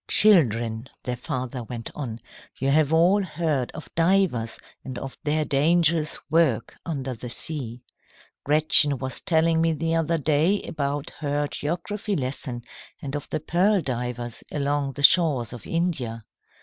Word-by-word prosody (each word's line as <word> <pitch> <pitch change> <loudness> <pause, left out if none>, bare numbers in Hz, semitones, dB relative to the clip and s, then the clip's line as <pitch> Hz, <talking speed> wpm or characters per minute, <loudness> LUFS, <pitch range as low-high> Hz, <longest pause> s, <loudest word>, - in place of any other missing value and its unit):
"Children," 120 - +4
their 125 - -3
father 125 +1 -4
went 115 0 -7
on, 120 -7 -5 0.4
"you 135 0 0
have 155 0 +3
all 175 +5 +4
heard 155 -8 -1
of 155 - -10
divers 165 -10 +2 0.3
and 130 -2 -7
of 135 -1 -6
their 155 +1 +1
dangerous 155 +2 +2
work 165 0 +1
under 135 -6 -4
the 120 +1 -8
sea. 125 -3 -2 0.6
Gretchen 150 -1 +4
was 130 0 -2
telling 165 -1 +2
me 165 0 +2
the 165 +2 -2
other 165 0 +1
day 155 +6 +2
about 145 -1 -3
her 145 -1 -1
geography 195 +8 -3
lesson, 130 -4 -3 0.4
and 145 -3 -5
of 145 - -5
the - - -2
pearl 185 +6 +2
divers 125 -4 -4
along 145 -1 -1
the 145 - -6
shores 145 -8 +4
of 120 -4 -10
India. 135 -10 -2
145 Hz, 145 wpm, -24 LUFS, 125-165 Hz, 0.6 s, Children